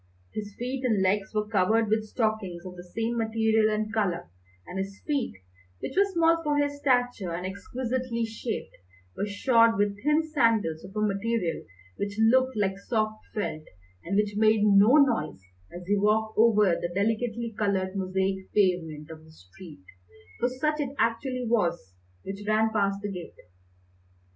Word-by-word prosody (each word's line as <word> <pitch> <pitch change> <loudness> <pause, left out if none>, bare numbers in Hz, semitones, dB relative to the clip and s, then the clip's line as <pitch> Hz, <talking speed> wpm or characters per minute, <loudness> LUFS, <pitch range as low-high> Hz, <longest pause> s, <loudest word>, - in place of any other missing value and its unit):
His 205 -1 -6
feet 255 +2 -4
and 220 -6 +2
legs 195 +1 +1
were 210 -1 -1
covered 220 +2 +2
with 215 +1 0
stockings 210 -6 -2
of 180 -1 -8
the 175 - -10
same 225 +6 -3
material 220 -1 +2
and 215 0 -2
colour, 180 - -1 0.3
and 190 - -6
his 195 +1 -5
feet, 285 - -1 0.4
which - - -5
were 395 +1 +3
small 330 -1 +3
for 295 -2 0
his 285 0 0
stature 245 -9 +1
and 175 +2 -4
exquisitely 235 +4 -3
shaped, 225 0 -5 0.4
were 205 - -2
shod 230 +2 +3
with 205 0 0
thin 300 +2 +3
sandals 230 - +1
of 190 +2 -12
a 210 - -1
material 200 -3 -1 0.3
which 200 0 -4
looked 255 +2 +3
like 195 -2 0
soft 215 0 -2
felt, 155 -7 -3 0.4
and 190 - -3
which 210 0 +1
made 215 0 +4
no 210 +5 +6
noise 230 - +2 0.3
as 175 0 -9
he 205 +3 +2
walked 215 +2 +1
over 210 -4 +4
the 175 - -4
delicately 225 +3 -1
coloured 195 -2 -1
mosaic 190 0 -2
pavement 170 -7 +1
of 155 -1 -11
the 160 - -17
street 150 - -14 0.6
for 245 - +1
such 300 +4 -1
it 280 -1 -3
actually 250 +2 0
was 170 - 0 0.3
which 195 +1 -6
ran 220 +1 +2
past 200 -2 +1
the 205 - -3
gate. 180 -3 -8
215 Hz, 165 wpm, -27 LUFS, 190-235 Hz, 0.6 s, no